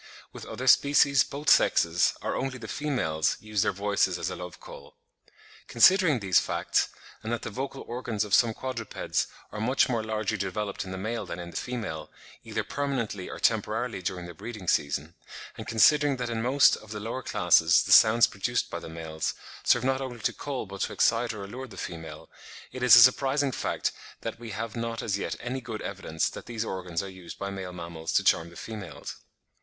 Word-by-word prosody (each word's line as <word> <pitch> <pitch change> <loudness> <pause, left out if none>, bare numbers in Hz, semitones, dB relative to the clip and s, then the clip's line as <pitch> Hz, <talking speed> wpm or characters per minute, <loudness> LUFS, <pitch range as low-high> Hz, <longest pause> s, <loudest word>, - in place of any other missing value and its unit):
With - - -9
other - - -5
species 140 -1 +5
both 145 +2 -8
sexes, 85 +1 +4
or - - -1
only 135 -1 -2
the 115 -3 -9
females, 105 - -1
use 110 -2 -1
their - - +2
voices 100 +1 0
as - - -3
a - - -4
love 90 0 -8
call. 70 - -13 0.7
Considering 170 +2 +5
these 95 -2 +4
facts, - - 0 0.3
and 110 +1 -5
that 120 -1 -2
the 115 - -5
vocal 135 +4 -5
organs 115 -3 -2
of 105 -2 -6
some 115 -2 +5
quadrupeds 125 -4 -3 0.2
are 105 - -5
much 125 +4 +3
more 115 -3 0
largely 110 -1 -2
developed 100 +1 -3
in 95 - -7
the 95 - -5
male 110 +4 -3
than - - -5
in 85 -1 -7
the - - -16
female, 105 -12 -4 0.3
either - - -3
permanently 125 -9 -3
or - - -7
temporarily 110 0 0
during 90 0 -4
the 85 - -9
breeding 105 +1 -8
season; 75 +2 0 0.4
and - - -8
considering 145 +5 +4
that 120 -1 -3
in 115 -1 -2
most 130 +4 +5
of 110 - -15
the 105 0 -5
lower 115 +5 -4
classes 85 -6 +4
the - - -4
sounds 115 +2 +8
produced - - -2
by - - -3
the - - -9
males, 80 -1 -4 0.3
serve 120 - +3
not 135 +1 +1
only 130 -2 -5
to - - 0
call 140 -5 -4
but 100 0 -8
to - - -1
excite 115 +1 +2
or 105 -3 -7
allure 125 +7 -7
the 115 - -13
female, 80 -2 -7 0.4
it 130 - -7
is 125 -1 +8
a 120 - +10
surprising 135 +3 +3
fact - - -2 0.3
that - - -5
we 120 -1 -8
have 110 +1 -5
not 115 -1 -3
as 100 -3 -1
yet - - -3
any 130 +2 -4
good 115 -3 -6
evidence 95 -5 -2
that - - -8
these 115 -1 -3
organs 90 -4 -3
are - - -6
used 95 -3 -10
by 100 0 -4
male 95 -2 -6
mammals 85 -2 -6
to - - +3
charm 80 +1 +3
the 85 - -16
females. 105 -6 -8
110 Hz, 205 wpm, -27 LUFS, 95-125 Hz, 0.7 s, a